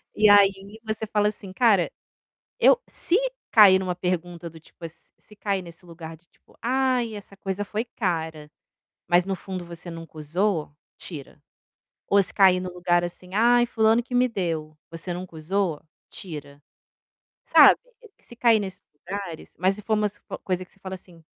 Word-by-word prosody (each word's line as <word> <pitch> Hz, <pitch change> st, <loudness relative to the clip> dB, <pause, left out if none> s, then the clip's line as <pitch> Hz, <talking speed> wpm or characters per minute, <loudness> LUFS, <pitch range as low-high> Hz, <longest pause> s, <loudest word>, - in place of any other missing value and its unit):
E 210 Hz, -1 st, +5 dB
aí 200 Hz, +1 st, +4 dB
você 220 Hz, 0 st, -3 dB
fala 210 Hz, 0 st, +1 dB
assim: 200 Hz, -3 st, -10 dB
"Cara, 205 Hz, -6 st, +3 dB, 0.7 s
eu 485 Hz, -, +6 dB
se 345 Hz, -, 0 dB, 0.3 s
cair 195 Hz, -4 st, +7 dB
em -, -, -3 dB
uma 180 Hz, -1 st, -2 dB
pergunta 175 Hz, -1 st, -3 dB
do 160 Hz, 0 st, -14 dB
tipo 165 Hz, +1 st, -11 dB
se 160 Hz, -, -23 dB
se 210 Hz, -, -19 dB
cair 200 Hz, -2 st, -2 dB
nesse 170 Hz, +1 st, -13 dB
lugar 165 Hz, -1 st, -9 dB
de 170 Hz, +2 st, -31 dB
tipo, -, -, -27 dB
ai 250 Hz, -2 st, +1 dB
essa 200 Hz, -1 st, -11 dB
coisa 195 Hz, +1 st, -3 dB
foi 215 Hz, +2 st, -3 dB
cara.", 160 Hz, -9 st, -3 dB, 0.6 s
mas 175 Hz, +1 st, +4 dB
no 195 Hz, -, -1 dB
fundo 185 Hz, 0 st, -7 dB
você 170 Hz, 0 st, -9 dB
nunca 165 Hz, -1 st, -10 dB
usou, 160 Hz, +1 st, -1 dB, 0.3 s
tira. 150 Hz, -6 st, -10 dB, 0.7 s
Ou 200 Hz, 0 st, +5 dB
se 195 Hz, -, -5 dB
cair 190 Hz, -2 st, +5 dB
no 185 Hz, 0 st, -5 dB
lugar 175 Hz, -1 st, +1 dB
assim: 180 Hz, +1 st, -8 dB
"Ai 240 Hz, +3 st, +4 dB
fulano 225 Hz, 0 st, +2 dB
que 250 Hz, +1 st, -5 dB
me 250 Hz, +1 st, +4 dB
deu.", 160 Hz, -7 st, -3 dB
você 165 Hz, +2 st, -5 dB
nunca 180 Hz, -1 st, -8 dB
usou, 170 Hz, 0 st, -1 dB, 0.3 s
tira. 145 Hz, -7 st, -9 dB, 0.9 s
Sabe? -, -, +7 dB, 0.4 s
Se 240 Hz, -, -14 dB
cair 230 Hz, -2 st, +4 dB
nesses 190 Hz, -2 st, -7 dB, 0.2 s
lugares, 190 Hz, -4 st, -6 dB
mas 185 Hz, +3 st, +2 dB
se 210 Hz, -, -11 dB
for 220 Hz, +1 st, 0 dB
umas 210 Hz, -1 st, -1 dB, 0.3 s
coisa 185 Hz, -1 st, -2 dB
que -, -, -26 dB
você 195 Hz, -, -25 dB
fala 190 Hz, 0 st, -6 dB
assim, 180 Hz, -3 st, -14 dB
190 Hz, 175 wpm, -25 LUFS, 170-210 Hz, 0.9 s, cair